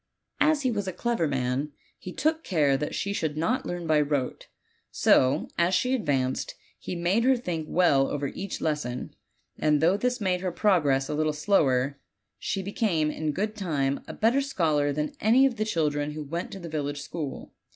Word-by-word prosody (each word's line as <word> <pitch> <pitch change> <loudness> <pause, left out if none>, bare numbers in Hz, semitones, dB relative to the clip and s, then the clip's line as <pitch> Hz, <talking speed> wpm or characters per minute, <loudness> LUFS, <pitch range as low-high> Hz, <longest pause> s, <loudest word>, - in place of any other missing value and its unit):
As 300 -1 +3
he 255 - +2
was 205 -3 -2
a 185 - -3
clever 235 -8 0
man, 135 +2 -1 0.3
he 180 - -7
took 315 - 0
care 150 -7 +2
that 150 +2 -3
she 200 - -2
should 155 -6 -2
not 170 +11 0
learn 175 -1 -4
by 155 -2 +3
rote; 145 -3 -2 0.4
so, 130 +4 +3
as 175 +2 +3
she 255 +1 +1
advanced, 135 - -1 0.2
he - - -5
made 175 +6 +1
her 260 +1 +4
think 165 -9 -4
well 145 -7 +3
over 145 -1 -2
each 195 -1 -6
lesson, 150 -6 -3 0.4
and 150 -1 +3
though 170 +6 +3
this 250 +3 0
made 185 -3 0
her 185 -1 -1
progress 150 -9 +2
a 150 - -3
little 155 0 0
slower, 140 -5 +2 0.4
she 195 - -2
became 185 -6 0
in 155 -1 -2
good 210 +7 -2
time 145 -9 -1
a - - -6
better 235 +5 +3
scholar 155 - +1
than 150 +1 -2
any 240 +5 +5
of 255 -3 0
the 215 - 0
children 150 -6 -1
who 155 0 -5
went 165 +5 -4
to 195 - -7
the 170 - -7
village 145 -2 -3
school. 150 -2 -6
160 Hz, 190 wpm, -27 LUFS, 145-200 Hz, 0.4 s, any